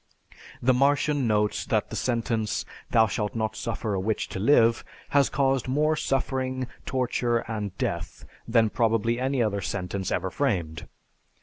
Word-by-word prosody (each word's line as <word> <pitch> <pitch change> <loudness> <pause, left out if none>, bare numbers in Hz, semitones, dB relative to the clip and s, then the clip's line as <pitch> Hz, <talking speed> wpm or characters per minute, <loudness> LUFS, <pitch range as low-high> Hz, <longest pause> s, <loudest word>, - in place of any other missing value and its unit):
The 130 +1 +5
Martian 140 +1 +2
notes 105 -1 +1
that - - 0
the - - -4
sentence, 115 -3 -1 0.2
"Thou 110 - +5
shalt 105 0 -3
not 110 -1 -1
suffer 110 -1 -3
a 95 - 0
witch 105 +3 -1
to - - -5
live," 115 0 +4 0.3
has 140 -1 +3
caused 135 -3 +1
more 150 +4 +2
suffering, 130 -2 -1 0.2
torture, 125 -2 0
and 105 -4 -4
death 85 -2 -3 0.2
than 115 -2 +3
probably 115 0 +1
any 130 -1 +1
other 100 -2 -1
sentence 95 0 -3
ever 95 +1 -1
framed. 85 - -1
115 Hz, 145 wpm, -26 LUFS, 105-130 Hz, 0.3 s, The